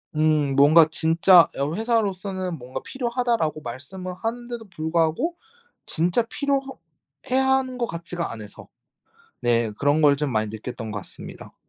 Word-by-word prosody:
음 150 -3 +2
뭔가 155 +3 +7
진짜 165 +1 +5
여기 145 +8 -2
회사로서는 195 -6 -1
뭔가 130 0 -7
"필요하다."라고 235 - -1
말씀을 150 +10 -7
하는데도 240 0 -4
불구하고 165 - 0 0.5
진짜 175 +8 +1
필요하 275 +3 -1 0.6
해야 265 +1 +3
하는 265 -1 +1
것 240 - 0
같지가 170 -2 -5
않아서. 105 -2 -10 0.7
네. 120 -2 +1
그런 145 +2 +2
걸 145 -1 +5
좀 145 -1 -1
많이 110 -1 0
느꼈던 110 +1 -6
것 105 - -4
같습니다. - - -10
165 Hz, 320 characters per minute, -24 LUFS, 145-230 Hz, 0.7 s, 뭔가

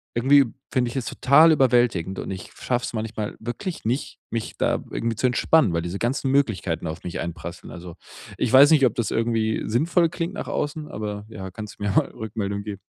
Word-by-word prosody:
irgendwie 135 +3 +5 0.3
finde 125 -3 +1
ich 120 - -9
es 125 - -2
total 155 +5 +5
überwältigend, 120 - +2
und - - -5
ich 95 -1 -7
schaffe 125 -1 -2
es - - -6
manchmal 110 -1 -4
wirklich 120 - -5
nicht, 125 +5 -2
mich 115 -1 -4
da - - 0
irgendwie 115 -1 -2
zu 120 - -1
entspannen, 125 - +3
weil 85 - 0
diese 90 +3 -4
ganzen 130 +3 -1
Möglichkeiten 110 -11 0
auf 80 +2 -6
mich 90 - -5
einprasseln. 85 +1 -6
Also, 85 -1 -9 0.4
ich - - 0
weiß 140 +4 +8
nicht, 140 -4 +6
ob 120 - +2
das 115 - -1
irgendwie 115 -1 0
sinnvoll 165 - +2
klingt 170 +3 -4
nach - - -6
außen, 150 +1 -3
aber 105 -1 -5
ja, 95 -3 -7
kannst 105 +2 -9
mir 100 -1 -1
mal - - +3
Rückmeldung 100 -2 -4
geben. 100 -2 -6
115 Hz, 200 wpm, -24 LUFS, 100-135 Hz, 0.4 s, weiß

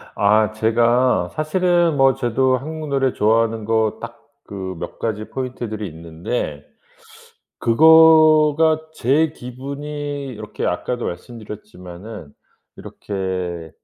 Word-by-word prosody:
아. 105 +1 +3
제가 120 +3 +2
사실은 175 0 +1
뭐 135 -1 +5
저도 130 +2 +1
한국 155 +2 -7
노래 135 -2 +1
좋아하는 110 0 +1
거 110 -1 0
딱 115 0 -9 0.3
그 95 -2 -6
몇 - - -7
가지 110 -1 -3
포인트들이 120 -5 -5
있는데 85 +8 -5 1.0
그거가 155 +3 +5
제 150 +3 +1
기분이 140 +2 -6
이렇게 110 -5 -6
아까도 120 +7 -3
말씀드렸지만은 105 -4 -9 0.4
이렇게 90 -4 -5
120 Hz, 235 characters per minute, -20 LUFS, 105-145 Hz, 1.0 s, 뭐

